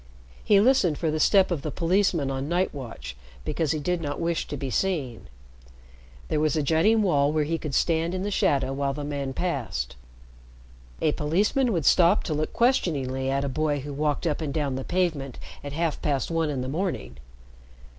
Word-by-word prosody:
He 205 - +5
listened 205 - +3
for 160 -2 0
the 155 - -1
step 190 +2 +4
of 165 -5 -1
the 155 - -3
policeman 170 -3 +1
on 135 +2 -3
night 180 +2 +1
watch, 110 - -7 0.3
because 160 -3 -1
he 155 - 0
did 175 +3 -1
not 145 -2 -3
wish 170 0 -1
to 145 - -5
be 135 -1 -4
seen. 140 - -1 1.0
There - - 0
was 155 0 +1
a 155 - +1
jutting 195 +9 +3
wall 145 -6 +3
where 155 0 +1
he 165 +2 -2
could 150 -3 -4
stand 165 +1 +1
in 185 - -2
the 205 - -2
shadow 135 -7 +1
while 140 0 -1
the 145 - -5
man 140 -2 -3
passed. 120 - -3 1.1
A 155 - +3
policeman 205 - +1
would 165 -8 -1
stop 180 +3 +5
to 160 - -2
look 155 +1 -1
questioningly 140 - +1
at 140 +1 0
a - - -1
boy 145 +1 0
who 145 +1 -6
walked 150 +3 -1
up 160 -1 0
and 150 -3 -2
down 145 -3 -1
the 130 +1 -3
pavement 160 -8 -1 0.3
at 145 -1 -6
half 165 0 -1
past 140 0 -1
one 165 -2 +1
in 135 -3 -2
the 130 - -3
morning. 135 - -3
155 Hz, 195 wpm, -26 LUFS, 140-175 Hz, 1.1 s, He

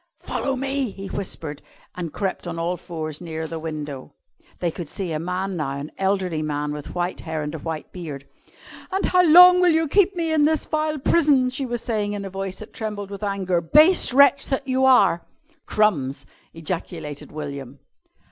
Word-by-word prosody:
"Follow 270 -1 -2
me!" 270 -1 -1
he 195 0 -9
whispered 160 -6 -4 0.3
and 170 -3 -5
crept 190 -1 -3
on 170 -1 -4
all 170 +2 -1
fours 155 -3 -6
nearer 160 -2 -5
the 160 0 -5
window. 150 -4 -6 0.4
They 175 -2 -1
could 165 -2 -7
see 185 -4 -4
a 155 - -2
man 180 +3 -3
now, 140 -4 -3
an 145 +2 -7
elderly 190 -4 0
man 150 -1 -2
with 150 -1 -8
white 175 +1 -2
hair 160 -2 -4
and 150 +1 -5
a 160 - -5
white 160 0 -5
beard. 150 -6 -7 0.6
"And 385 +1 -1
how 365 0 +4
long 360 +2 +9
will 360 - +5
you 320 -1 +2
keep 395 +4 +3
me 330 -2 -1
in 300 -2 +4
this 310 0 +1
vile 310 0 -1
prison?" 280 -3 +3
she 265 +1 -3
was 240 -1 -4
saying 210 -3 -1
in 200 -1 -4
a 195 - -6
voice 195 0 -5
that 215 - -11
trembled 205 -3 -5
with 200 - -7
anger, 190 -4 0
"base 305 - +5
wretch 280 +2 +5
that 270 0 -2
you 260 0 +2
are!" 250 -10 +5 0.4
"Crumbs!" 155 -11 +1 0.3
ejaculated 160 -3 -5
William. 140 -3 -7
190 Hz, 185 wpm, -23 LUFS, 160-265 Hz, 0.6 s, long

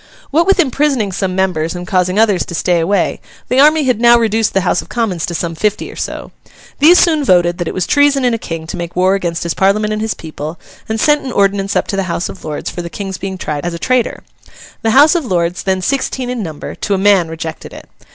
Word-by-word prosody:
What 330 +5 +2
with 390 0 +3
imprisoning 270 - +1
some 185 0 -2
members 180 -4 -1
and 175 0 -6
causing 185 0 0
others 210 -5 +3
to 170 - -5
stay 175 +1 +1
away, 180 +3 0 0.3
the 255 +2 +2
army 305 +2 +5
had 250 -4 0
now 240 0 +7
reduced 225 -2 0
the 195 - +3
House 180 - +1
of - - -16
Commons 205 -9 -2
to 170 - -4
some 165 0 -3
fifty 210 +5 -2
or - - -12
so. - - -5 0.5
These 325 +5 +7
soon 315 -5 +3
voted 175 -5 +2
that 175 - -2
it - - -3
was 185 - 0
treason 285 -2 +3
in 245 - +2
a 230 - -2
king 165 -4 -6
to 170 - -6
make 170 -1 -6
war 185 +1 +3
against 170 -4 -2
his 170 - -2
parliament 210 +2 +1
and 215 - -3
his 220 -1 -2
people, 155 0 -7 0.3
and 220 0 -1
sent 295 +4 +3
an 260 - -5
ordinance 200 -1 +1
up - - +1
to - - -1
the 195 -2 -2
House 170 - -2
of 190 - -10
Lords 150 -2 -4
for 175 - -5
the 170 - -6
King's 195 0 -6
being 190 0 -5
tried 150 -4 -4
as 175 -1 -3
a - - -4
traitor. 255 +5 -1 0.6
The 225 - 0
House 285 +7 +6
of 345 -3 0
Lords, 180 -5 -1
then 190 -1 -1
sixteen 260 0 -1
in 250 -2 -3
number, 160 -6 -6
to 200 - -2
a - - -1
man 195 -3 +3
rejected 160 0 -7
it. - - -12
195 Hz, 250 wpm, -15 LUFS, 175-240 Hz, 0.6 s, now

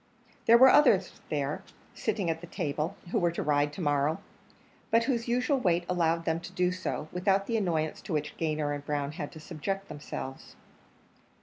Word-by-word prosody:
There 230 +1 +9
were 260 +2 +9
others 205 -11 +4
there, 145 -1 -1 0.3
sitting 195 -5 -1
at 165 0 -5
the 175 - -9
table, 155 +4 -2 0.2
who - - +2
were 175 - +3
to - - -2
ride 145 -1 +2
to 185 - -6
morrow, 145 0 +1 0.7
but 230 +1 +4
whose 235 -2 -1
usual 250 +3 +1
weight 175 -5 +1
allowed 165 -2 +1
them 160 0 +1
to 175 +2 -9
do 180 -1 +1
so, 185 -4 -3
without 195 +2 +1
the 230 - -1
annoyance 165 -7 0
to 180 - -5
which 150 -1 -2
Gayner 155 -2 -1
and 145 -1 -5
Brown 145 -1 -2
had 145 -1 -6
to 160 - -10
subject 190 +5 -4
themselves. 135 -2 -7
170 Hz, 185 wpm, -29 LUFS, 150-195 Hz, 0.7 s, There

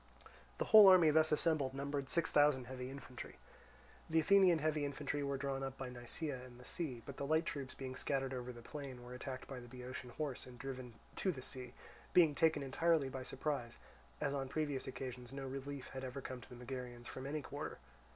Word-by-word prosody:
The - - 0
whole 215 -2 +10
army 180 -5 +8
thus 155 +1 +4
assembled 150 -4 +2
numbered 140 0 -2
six 170 - +1
thousand 145 -3 +5
heavy 125 0 -5
infantry. 135 -2 -8 0.7
The 160 0 +4
Athenian 185 +1 +6
heavy 155 -1 +1
infantry 145 +1 -2
were 140 -1 -1
drawn 135 0 -2
up 135 0 -4
by 135 -1 -4
Nisaea 125 +2 -4
and 125 -1 -12
the 125 - -12
sea; 130 -9 -3
but 140 - -7
the - - -3
light 160 +2 +3
troops 135 -4 -4
being 130 -1 -5
scattered 135 -1 -1
over 125 -1 -4
the 120 -1 -11
plain 135 -3 -7
were 125 +1 -8
attacked 130 0 -5
by 135 -2 -6
the 120 - -10
Boeotian 125 +1 -7
horse 140 0 -4
and 125 -1 -11
driven 130 -3 -6 0.2
to 190 - +2
the 130 -6 -7
sea, 125 -1 -7 0.4
being 165 -4 +7
taken 155 -1 +3
entirely 155 +1 +2
by 130 0 -5
surprise, 130 -2 -3 0.4
as 140 - 0
on 135 -2 -2
previous 145 -2 -1
occasions 125 -2 -6
no 135 0 -5
relief 135 +1 -5
had 130 0 -6
ever 130 +1 -4
come 130 -1 -6
to - - -13
the 125 - -9
Megarians 125 -1 -6
from 130 +1 -6
any 150 +1 -2
quarter. 145 +2 -5
135 Hz, 205 wpm, -38 LUFS, 125-150 Hz, 0.7 s, whole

